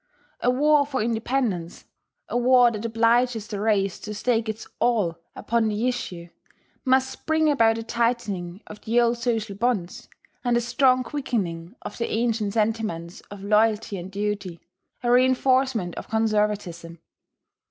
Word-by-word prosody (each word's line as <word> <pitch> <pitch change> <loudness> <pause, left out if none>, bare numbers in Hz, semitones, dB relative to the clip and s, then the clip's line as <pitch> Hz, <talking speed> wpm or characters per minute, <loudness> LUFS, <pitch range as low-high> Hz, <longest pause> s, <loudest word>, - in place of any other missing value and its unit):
A 245 - +1
war 295 +3 +4
for 270 -4 -2
independence, 225 -6 -2 0.4
a - - -5
war 245 0 +5
that 215 -1 -5
obliges 230 0 +2
the 205 -2 -5
race 200 -3 +1
to 210 -1 -7
stake 225 +1 0
its 220 0 -5
all 215 -8 +1 0.2
upon 230 -1 0
the 215 +3 0
issue, 180 -9 -4 0.5
must 260 0 +1
bring 315 0 +3
about 225 -5 +3
a 225 - -4
tightening 225 -6 -2
of 210 - -11
the 230 +2 +1
old 235 0 +2
social 225 -4 -1
bonds, 205 -5 -2 0.3
a 240 -1 +2
strong 255 +2 +2
quickening 205 - -3
of - - -7
the 235 - -1
ancient 220 -3 0
sentiments 215 -6 -2
of 200 -1 -10
loyalty 215 0 +2
and 180 +2 -8
duty, 200 -4 -3 0.4
a 240 - +2
reinforcement 255 -5 +2
of - - -8
conservatism. 210 -6 -1
225 Hz, 140 wpm, -24 LUFS, 205-245 Hz, 0.5 s, war